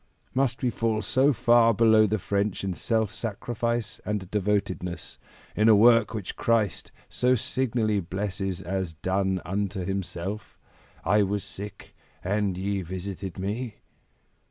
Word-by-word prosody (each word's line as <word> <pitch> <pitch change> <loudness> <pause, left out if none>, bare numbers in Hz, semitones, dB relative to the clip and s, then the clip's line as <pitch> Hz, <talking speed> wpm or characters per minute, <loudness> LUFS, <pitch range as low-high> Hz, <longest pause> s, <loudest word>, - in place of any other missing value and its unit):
Must 130 -2 0
we 125 - +2
fall 110 -1 0
so 130 +8 +3
far 120 -2 +4
below 110 0 +5
the 110 +2 0
French 100 +1 -1
in 95 -1 -1
self 110 +5 0
sacrifice 115 +1 -3
and 105 -3 -3
devotedness, 100 -4 -2 0.4
in 105 +2 +4
a 110 - +8
work 115 +1 +6
which 100 -4 -5
Christ 110 -5 0 0.2
so 125 +1 +2
signally 115 -3 0
blesses 95 0 -3
as 95 -3 -3
done 95 +2 -1
unto 95 0 -2
Himself? 95 +1 -4 0.5
'I 105 0 +4
was 100 0 0
sick 100 +1 -8 0.3
and 100 -1 0
ye 100 +1 -1
visited 95 +1 -6
me.'" 105 +4 -3
105 Hz, 130 wpm, -26 LUFS, 95-115 Hz, 0.5 s, a